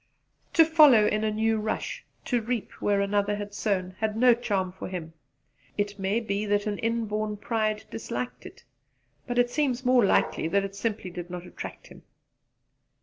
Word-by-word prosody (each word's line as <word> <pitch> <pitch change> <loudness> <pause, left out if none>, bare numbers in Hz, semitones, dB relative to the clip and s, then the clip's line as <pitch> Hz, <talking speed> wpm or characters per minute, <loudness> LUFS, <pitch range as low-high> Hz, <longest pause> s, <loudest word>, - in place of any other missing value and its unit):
To 325 - +7
follow 300 -9 +7
in 210 +1 +1
a 220 - +2
new 220 +1 +1
rush, 215 +1 -3 0.2
to 245 -2 +1
reap 235 0 -3
where 200 -1 +2
another 205 +1 +1
had 205 0 -6
sown, 190 -4 -1
had 220 -1 -1
no 245 +1 +6
charm 200 -6 -1
for 185 - -7
him. 170 -3 -6 0.6
It 205 0 -2
may 195 +4 +1
be 205 -2 -2
that 205 0 +1
an 205 -2 -2
inborn 215 -2 -1
pride 215 0 -1
disliked 235 +2 -5
it; - - -15 0.6
but 245 -1 -3
it 245 0 +3
seems 265 -4 0
more 250 -1 +5
likely 190 -4 +2
that 200 +4 +2
it 195 0 -6
simply 205 -3 -3
did 175 0 -7
not 180 0 -6
attract - - -8
him. - - -14
210 Hz, 175 wpm, -27 LUFS, 200-235 Hz, 0.6 s, To